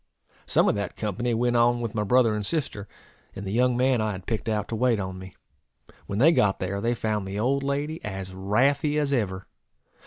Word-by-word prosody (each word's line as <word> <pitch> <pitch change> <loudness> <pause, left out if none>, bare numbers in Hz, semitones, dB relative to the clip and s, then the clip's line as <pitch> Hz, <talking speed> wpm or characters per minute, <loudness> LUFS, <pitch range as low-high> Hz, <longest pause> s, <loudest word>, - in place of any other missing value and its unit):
Some - - +3
of - - +3
that 100 -2 -4
company 115 +3 -2
went 120 +1 +1
on 120 0 +3
with 115 -2 -3
my 110 - -1
brother 115 +1 +3
and 105 -1 -2
sister, 105 -6 -3 0.5
and 100 - -6
the 95 - -4
young 125 +2 +2
man 130 -2 +2
I 110 -1 -1
had 95 -1 -8
picked 115 0 -2
out 105 -1 -1
to 115 - -2
wait 120 -1 +2
on 95 -1 -5
me. 95 0 -11 0.7
When 100 - -3
they 145 +9 +6
got 105 - +2
there, 100 +2 -3
they 120 +2 0
found 105 -3 -2
the 100 +2 -4
old 135 +5 +1
lady 145 +3 -2
as 95 -2 -6
wrathy 135 +10 +1
as 145 -2 0
ever. 95 -7 -1
110 Hz, 215 wpm, -26 LUFS, 100-125 Hz, 0.7 s, they